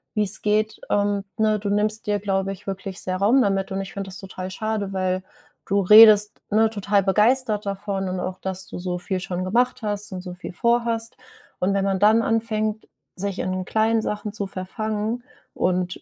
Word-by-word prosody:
wie's 210 -1 0
geht”, 215 +1 0
ähm, 205 -1 +1
ne? 215 -1 +2
Du 205 0 -3
nimmst 210 +2 0
dir, 205 0 +1
glaube 195 -1 -1
ich, 195 - -10
wirklich 195 -1 -5
sehr 185 0 -2
Raum 220 +8 +4
damit 195 -2 0
und 195 - -2
ich 195 - -8
finde 195 -1 -5
das 185 - -7
total 185 -1 -7
schade, 215 -1 -3
weil 185 0 -1 0.4
du 200 0 +2
redest, 210 +1 +7
ne, 220 +1 +3
total 205 -1 +1
begeistert 210 +2 +2
davon 195 -1 -3
und 185 0 -3
auch, 185 0 -4
dass 190 0 -4
du - - -7
so 180 0 -3
viel 185 +1 -3
schon 185 -1 -4
gemacht 245 +6 +1
hast 205 0 -2
und 185 - -5
so 180 -1 -7
viel 180 0 -8
vorhast. 235 +1 0 0.4
Und 185 +2 +1
wenn 195 - +1
man 195 -1 0
dann 215 +3 +5
anfängt, 220 -1 -1 0.3
sich 195 0 -3
in 185 0 -2
kleinen 220 +2 +2
Sachen 210 0 -3
zu 205 -2 -3
verfangen 215 +5 -3 0.3
und, 180 0 -1
200 Hz, 190 wpm, -23 LUFS, 190-215 Hz, 0.4 s, redest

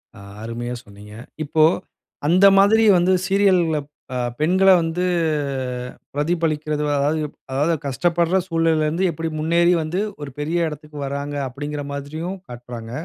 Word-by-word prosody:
ஆ, - - -12 0.2
அருமையா 120 +2 -4
சொன்னீங்க. 105 +1 -13 0.3
இப்போ, 155 +1 +2 0.6
அந்த 185 +4 +5
மாதிரி 220 +3 +5
வந்து 180 +2 +3
சீரியல்‌கள்ல 185 -6 +3 0.4
அ, - - -1 0.2
பெண்கள 185 +5 +4
வந்து, 165 +2 -1 1.1
பிரதிபலிக்கிறது 155 -1 -1
அதாவது 150 +3 +1 0.3
அதாவது 150 +5 +1
கஷ்டப்படுற 170 +6 +1
சூழ்நிலைல 165 -3 +1
இருந்து 170 +5 -1
எப்படி 165 0 -4
முன்னேறி 170 +3 +3
வந்து, 165 +5 -2 0.2
ஒரு 145 - -5
பெரிய 165 +3 0
எடத்துக்கு 150 0 -9
வராங்க 140 +1 -4
அப்படீங்கிற 145 +3 -5
மாதிரியும், 155 +7 -5
காட்டுறாங்க. 120 -1 -8
155 Hz, 125 wpm, -21 LUFS, 145-175 Hz, 1.1 s, அந்த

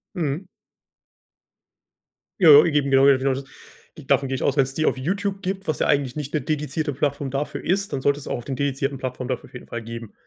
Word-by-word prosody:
Mhm. 165 +1 -2 1.9
Ja, 150 -5 +9
eben, 145 -4 +1
genau 135 0 +6
genau 135 -1 +4
das, 135 +1 -5 0.5
davon 135 - 0
gehe 135 - -1
ich - - -4
aus. 140 - +1
Wenn's 135 -1 +2
die 155 - 0
auf - - +2
YouTube 195 +8 -2
gibt, 190 +1 -3
was 155 - -2
ja - - +2
eigentlich 135 -3 +1
nicht 150 -2 -5
'ne 155 - +2
dedizierte 150 0 -2
Plattform 140 0 -1
dafür 140 +2 -3
ist, 195 +2 0
dann 135 - -2
sollte 140 +2 +1
es - - -9
auch - - -2
auf 120 - -9
den 135 - -4
dedizierten 140 +1 -1
Plattform 130 -1 -4
dafür 125 -2 -4
auf - - -28
jeden 125 - -9
Fall 120 -1 -6
geben. 115 -1 -8
140 Hz, 215 wpm, -23 LUFS, 130-155 Hz, 1.9 s, Ja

